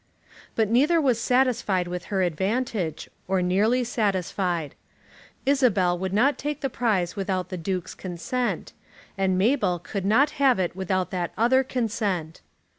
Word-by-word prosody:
But 220 -1 +2
neither 295 +8 +4
was 255 -6 +2
satisfied 235 -8 +1
with 180 0 -5
her 195 -2 0
advantage, 190 - -1 0.2
or 190 -1 +1
nearly 215 +8 +2
satisfied. 185 - -1 0.7
Isabel 235 -10 +3
would 185 +1 -3
not 245 +7 +2
take 295 0 -3
the 270 - -2
prize 205 -8 0
without 190 -2 -2
the 185 - -4
Duke's 185 +1 -3
consent; 215 +8 -3 0.4
and 190 -2 +1
Mabel 205 -3 +2
could 190 +3 -5
not 240 +9 +3
have 265 -3 +5
it 180 -2 -1
without 185 -1 -1
that 180 -2 -3
other 260 +4 +4
consent. 210 -10 -2
200 Hz, 140 wpm, -25 LUFS, 180-250 Hz, 0.7 s, have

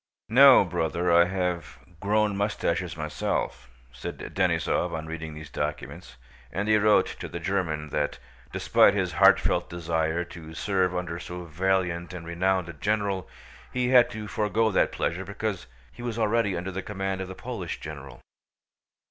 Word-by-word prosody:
"No, 130 -1 +8
bwother, 85 0 -1
I 85 0 +6
have 90 -5 -2 0.2
gwown 105 +1 +1
mustaches 90 -5 -1
myself," 75 -5 -3 0.2
said 60 - -7 0.2
Denísov 90 -1 +1
on 80 -1 -4
reading 80 -1 -6
these 75 -3 -10
documents, 75 +3 -5 0.4
and 95 +5 -2
he 110 0 +5
wrote 105 0 +5
to - - -5
the 85 - -6
German 80 -4 -2
that, 75 -1 -1 0.3
despite - - +4
his - - 0
heartfelt - - +4
desire 85 0 -1
to 80 -2 -11
serve 95 -1 0
under 90 -1 -3
so 90 +1 -7
valiant 90 +1 -1
and 85 -2 -7
renowned 90 +1 0
a 85 - -7
general, 100 +3 -1 0.4
he 125 -1 0
had 125 -2 +6
to 105 -1 -6
forgo 110 +1 +1
that - - +2
pleasure 90 +3 -2
because 100 - -4 0.2
he - - -12
was 120 -2 -4
already 110 -3 +1
under 90 +3 -4
the 95 +1 -4
command 95 -1 -3
of 95 - -4
the 95 - -8
Polish - - -5
general. 70 -5 -9
90 Hz, 155 wpm, -26 LUFS, 80-100 Hz, 0.4 s, No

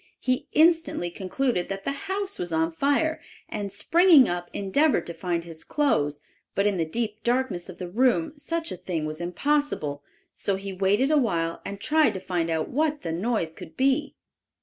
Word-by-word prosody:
He 255 +3 -1
instantly 325 - +3
concluded 190 +2 -1
that 195 0 -4
the - - -1
house 390 +6 -3
was 175 -1 -3
on 160 +1 +1
fire, 285 - +1 0.3
and 205 -2 -4
springing 330 - +6
up, 175 0 -3
endeavored 275 +11 +1
to 170 - -5
find 170 -2 -2
his 165 -2 -10
clothes, 150 - 0 0.3
but 200 - +2
in 205 -2 +2
the 165 - +1
deep 215 +5 -2
darkness 240 -8 0
of 185 - -9
the 180 - -5
room 260 - +1
such 325 +3 -3
a - - -5
thing 165 -4 -3
was 155 +2 -5
impossible; 180 - -1 0.3
so 200 - -1
he 195 0 -6
waited 200 +9 +2
a 305 - +5
while 170 -9 -1
and 200 - -6
tried 310 0 +3
to - - -3
find 175 -3 -2
out 160 -1 0
what 300 +2 0
the 165 - -2
noise 180 -1 -1
could 160 - -12
be. 265 +1 +1
200 Hz, 185 wpm, -26 LUFS, 175-285 Hz, 0.3 s, springing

